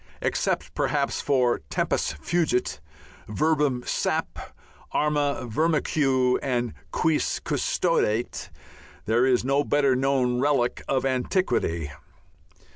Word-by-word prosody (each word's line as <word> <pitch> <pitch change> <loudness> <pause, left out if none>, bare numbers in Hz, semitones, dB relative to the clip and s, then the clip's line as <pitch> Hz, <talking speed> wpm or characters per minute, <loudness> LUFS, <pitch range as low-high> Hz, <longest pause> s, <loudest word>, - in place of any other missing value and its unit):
Except - - -1
perhaps - - 0
for 125 -3 +2
"Tempus - - 0
fugit," 125 - -1 0.5
"verbum 145 0 +1
sap.," - - -2 0.4
"Arma 145 -3 0
virumque," 135 -2 +1
and 120 -3 -1 0.2
"Quis 160 -1 0
custodiet," 110 +3 0 0.6
there 120 +4 +3
is 125 -1 +2
no 140 +2 +2
better 140 -3 +2
known 130 -2 +1
relic 135 -3 +1
of 135 -1 0
antiquity. 125 - 0
130 Hz, 95 wpm, -25 LUFS, 125-145 Hz, 0.6 s, there